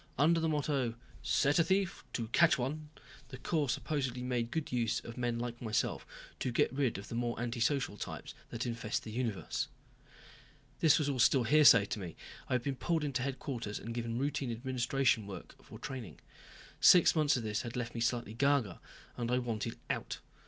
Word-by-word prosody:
Under 165 +5 +4
the 160 0 +1
motto 140 -6 0 0.3
"Set 145 +4 +2
a - - +6
thief 190 +2 0
to 115 -2 -2
catch 170 +6 +5
one," 150 +4 -3 0.4
the 130 - -8
Corps 150 -2 -1
supposedly 135 -3 -2
made 125 -2 -1
good 160 +3 -3
use 120 -3 +1
of 115 - -9
men 120 -2 -1
like 120 0 -5
myself 110 -2 -1 0.3
to 125 - -1
get 120 - +2
rid 135 -6 0
of 100 - -8
the - - -7
more 120 0 -2
antisocial 120 -1 0
types - - -6 0.2
that 120 +1 -4
infest 115 -2 -2
the 110 - -7
universe. 115 -4 -2 1.1
This 155 -2 +5
was 140 -5 +2
still 130 +3 +5
all - - -1
hearsay 125 -5 +7
to 105 - -4
me. 90 -4 -7 0.3
I - - 0
had 125 -1 +1
been 135 -1 -2
pulled 165 +1 0
into 140 -3 -1
headquarters 130 -5 -4
and 115 - -6
given 115 -1 -3
routine 135 -1 -1
administration 125 -2 0
work 95 -3 -8
for - - -11
training. 120 - -7 0.6
Six 180 -2 +7
months 150 -3 +3
of 120 - -3
this 105 0 -1
had 120 -1 -6 0.2
me 115 - -4
slightly 120 -2 0
ga 140 +4 +3
ga 100 -7 -9 0.4
and 120 -1 -2
I 125 - +2
wanted 115 -2 -3
out. - - -3
125 Hz, 190 wpm, -33 LUFS, 115-140 Hz, 1.1 s, hearsay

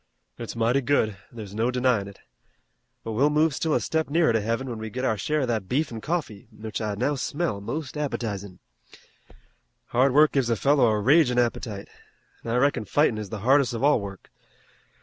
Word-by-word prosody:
"It's 115 -1 -6
mighty 115 +4 +2
good. 120 -6 +1 0.2
There's 105 -4 -9
no 115 +3 0
denyin' 125 -5 +1
it, 100 - -13 0.8
but 115 - -5
we'll 135 +7 +3
move 155 +1 +2
still 155 +2 0
a - - +3
step 160 -2 -1
nearer 160 -4 +3
to 110 - +1
Heaven, 115 +5 -2
when 115 -3 -5
we 110 0 -5
get 125 +4 -4
our 110 - +1
share 150 +9 -1
of 130 - -1
that 110 -5 -2
beef 145 +2 0
an' 115 -1 -6
coffee, 150 - -4
which 110 0 -6
I 105 -1 -2
now 125 +8 0
smell 140 -4 -2
most 145 +7 -5
appetizin'. 105 -10 -4 1.3
Hard 130 +3 +3
work 150 +1 +6
gives 135 -4 0
a 115 - +2
fellow 140 +2 +3
a 110 -1 +1
ragin' 130 +2 +4
appetite, 115 -4 -1 0.6
an' - - -6
I 115 - 0
reckon 130 -3 +1
fightin' 130 -3 +2
is 105 -2 -6
the 105 0 -6
hardest 135 -2 +3
of 115 - -4
all 145 -5 +4
work. 100 -1 -9
120 Hz, 200 wpm, -25 LUFS, 110-145 Hz, 1.3 s, work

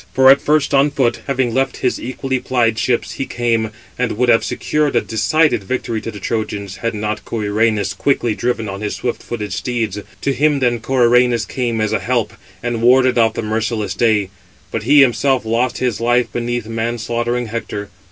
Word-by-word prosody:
For 130 0 +7
at 140 - +5
first 150 -1 +1
on 140 +1 +4
foot, 130 -4 0
having 130 -4 0
left 135 +1 0
his 125 - 0
equally 130 +1 -3
plied 115 -3 +1
ships, 120 -2 0
he 135 - -4
came, 115 -2 0 0.3
and 125 -2 0
would 125 +3 +1
have 115 -1 +5
secured 150 -1 -1
a - - +4
decided 150 +2 +1
victory 115 0 -3
to - - -5
the 105 - -8
Trojans, 105 -2 -3
had 115 -1 -3
not 105 0 -3
Coeranus 105 -2 0
quickly 120 -5 0
driven 120 0 -2
on 100 0 -6
his 105 - -3
swift 120 - -3
footed 105 -3 -5
steeds: 115 -5 -2 0.2
to 140 - 0
him 150 +1 +2
then 125 -2 +2
he 120 - -4
(Coeranus) 120 -2 +3
came 120 -3 -2
as 110 -1 0
a - - +1
help, 115 -3 -1 0.3
and 120 -1 -2
warded 125 +1 +4
off 115 -1 +3
the - - -3
merciless 110 -2 -2
day; 105 -3 +1 0.4
but - - -2
he 145 0 +8
himself 130 0 +2
lost 120 +3 0
his 125 -4 -1
life 120 +1 +1
beneath 120 -1 -2
man 115 +1 -2
slaughtering 120 +2 -2
Hector. 105 -2 -5
120 Hz, 190 wpm, -18 LUFS, 110-125 Hz, 0.4 s, he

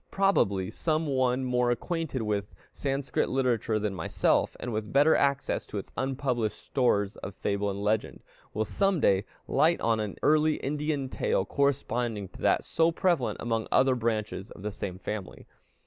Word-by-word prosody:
Probably, 100 - +2
some 160 0 0
one 130 -2 +1
more 125 -1 +2
acquainted 145 0 -2
with 105 -2 -2 0.2
Sanskrit 135 -1 -1
literature 120 -4 +1
than 105 -1 -1
myself, 90 -4 +1
and 120 - -4
with 110 0 -3
better 145 +3 +5
access 140 0 0
to - - -5
its - - -6
unpublished 130 -4 -1
stores 105 -6 0
of 100 - -7
fable 100 0 -1
and 100 +1 -4
legend, 105 +1 -1 0.3
will 110 +1 -1
some 195 - +1
day 95 -5 +3 0.2
light 165 +2 +3
on 115 -1 +1
an 105 -3 -3
early 155 0 +4
Indian 150 0 -2
tale 95 -6 0
corresponding 120 -7 -1
to - - -14
that - - +3
so 165 0 +2
prevalent 170 -6 +1
among 115 -1 -1
other 130 0 +4
branches 110 -4 -2
of 95 - -12
the 105 - -2
same 95 -2 -5
family. 100 +1 -6
125 Hz, 165 wpm, -28 LUFS, 105-140 Hz, 0.3 s, better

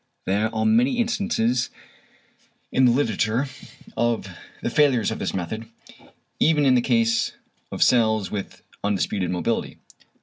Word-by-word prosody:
There 105 +4 +1
are 110 - 0
many 245 +3 +3
instances 200 - 0 1.0
in 130 - +4
the 125 - +5
literature 120 0 0 0.5
of 120 -4 0 0.4
the 120 - -1
failures 130 -6 +3
of 110 - -4
this - - -2
method, 110 +5 -4 0.7
even 150 -2 +3
in 130 - +5
the 125 - +4
case 115 -2 +1 0.4
of - - +2
cells 110 -4 +2
with 100 -2 -6 0.2
undisputed 100 -2 -1
mobility. 90 +6 -2
115 Hz, 130 wpm, -23 LUFS, 110-135 Hz, 1.0 s, the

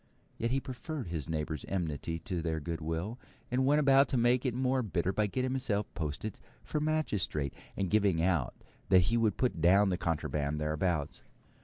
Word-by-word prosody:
Yet 115 - 0
he 135 +3 +1
preferred 135 - -5
his 80 -3 -3
neighbour's 75 -2 -2
enmity 85 -3 -2
to 85 +1 -4
their 80 -1 -1
goodwill, 80 +7 -3 0.3
and 130 +1 +2
went 145 +2 +5
about 135 -1 +6
to 130 - 0
make 120 +2 +3
it 120 - -1
more 130 0 +1
bitter 95 -4 -1
by 105 +1 +1
getting 130 +5 -1
himself 115 -6 0
posted 80 +6 -4 0.2
for 150 - -2
magistrate, 110 - -1 0.2
and 95 - 0
giving 100 -3 +3
out 85 -7 +1 0.3
that 90 0 +5
he - - +4
would 110 -2 +2
put 125 -10 0
down 95 +4 +5
the 90 -1 -1
contraband 75 -2 -1
thereabouts. 75 0 -1
95 Hz, 175 wpm, -31 LUFS, 80-125 Hz, 0.3 s, about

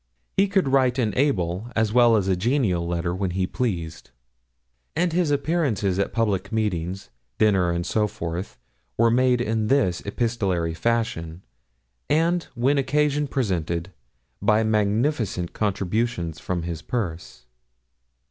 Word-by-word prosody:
He 195 - +4
could 195 -5 +1
write 130 -2 +3
an 110 -6 0
able 105 - 0
as 110 -1 +1
well 120 -2 +6
as 100 -2 0
a 95 - +2
genial 95 -5 +1
letter 85 0 -1
when 95 +1 -1
he 90 +1 0
pleased; 85 -9 -3 0.9
and 170 +1 +1
his 175 -2 +2
appearances 140 - 0
at 100 - 0
public 100 -4 0
meetings, 95 - -2 0.3
dinners, 95 -5 +3
and 85 0 -2
so 105 +2 +1
forth 85 -1 -5 0.4
were 115 0 +4
made 125 0 +3
in 110 -2 0
this 105 -10 +2
epistolary 100 -7 -1
fashion, 90 -5 -2 0.7
and, 165 +3 +2
when 135 +4 +2
occasion 145 +2 +1
presented, 90 - -2 0.5
by 105 +2 +3
magnificent 110 - 0
contributions 100 -3 -1
from 90 -2 -3
his 85 -1 -4
purse. 85 - -4
105 Hz, 130 wpm, -24 LUFS, 90-125 Hz, 0.9 s, well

